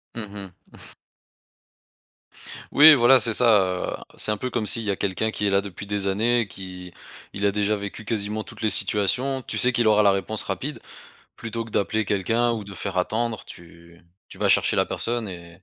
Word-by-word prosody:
Mmh 110 -3 -7
mh. 100 -2 -9 2.2
Oui, 155 +2 +9
voilà 130 -1 +5
c'est 115 0 +3
ça, 120 +1 +4 0.5
heu. - - -12
C'est - - +1
un 105 - -2
peu 125 +4 -4
comme 115 -3 -3
s'il 115 +2 +4
y 105 - -1
a 100 - -2
quelqu'un 100 +3 -2
qui 105 -1 -4
est - - +2
là 100 0 +2
depuis 100 -1 -8
des 100 -1 -2
années 115 +3 0
qui 90 -2 -10 0.4
il 100 +1 -3
a 100 - +3
déjà 105 +1 0
vécu 100 +1 -8
quasiment 105 -1 -3
toutes - - -12
les 110 - +1
situations. 125 +7 +2
Tu - - -5
sais 125 0 +5
qu'il 120 -2 +2
aura 105 0 +4
la 100 - +5
réponse 100 +2 0
rapide, 110 +10 -5 0.6
plutôt 115 0 -6
que 115 - -13
d'appeler 110 +2 -1
quelqu'un 115 +5 0
ou 110 -2 -4
de 100 -1 -11
faire 95 - -4
attendre, 110 +4 -2
tu 85 0 -15 0.3
tu - - -13
vas - - 0
chercher - - +2
la - - +2
personne 120 -2 -2
et 85 0 -12
105 Hz, 200 wpm, -23 LUFS, 100-115 Hz, 2.2 s, Oui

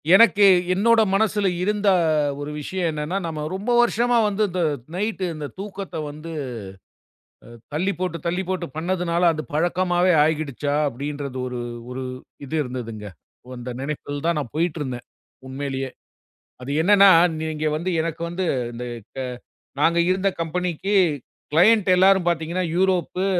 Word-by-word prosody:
எனக்கு 210 -2 +6 0.3
என்னோட 225 +4 +4
மனசுல 205 0 +2 0.2
இருந்த 210 +1 0 0.5
ஒரு 145 +1 -5
விஷயம் 180 +3 -2
என்னன்னா, 155 +4 -3
நாம 155 -2 -4
ரொம்ப 205 +6 -2
வருஷமா 240 0 +3
வந்து 210 +1 0
இந்த 180 0 -2 0.3
நைட்டு 205 0 -2
இந்தத் 150 -2 -7
தூக்கத்த 195 -2 -7
வந்து 155 +3 -9 1.2
அ - - -13 0.2
தள்ளிப் 180 +4 -1
போட்டு, 180 -2 -2
தள்ளிப் 180 +2 -2
போட்டு 185 -2 -2
பண்ணதுனால 175 +1 -1
அது 155 0 -4
பழக்கமாவே 175 +2 +2
ஆகிடுச்சா 150 -2 -1
அப்படின்றது 140 0 -5
ஒரு 125 -1 -5 0.3
ஒரு 130 +1 -5 0.4
இது 150 +4 -4
இருந்துதுங்க. 115 -5 -6 0.5
அந்த 120 +1 -7
நெனைப்பில் 145 0 -5
தான் 170 -2 +1
நான் 135 -6 -6
போயிட்டு 170 0 0
இருந்தேன் 125 -3 -5 0.4
உண்மையிலேயே. 135 0 -4 0.7
அது 130 - -6
என்னன்னா, 200 +2 +7 0.3
நீங்க 155 -1 -3
வந்து 175 +4 -2
எனக்கு 165 0 -4
வந்து 180 +2 -2 0.3
இந்த 120 +1 -6 1.0
நாங்க 170 +2 +3
இருந்த 190 +1 +2
கம்பெனிக்கு 180 +3 -2 0.6
க்ளையன்ட் 195 +5 +5
எல்லாரும் 190 -1 +4
பாத்தீங்கன்னா 170 +2 -1
யூரோப்பு, 185 0 +1
170 Hz, 130 wpm, -23 LUFS, 150-190 Hz, 1.2 s, என்னன்னா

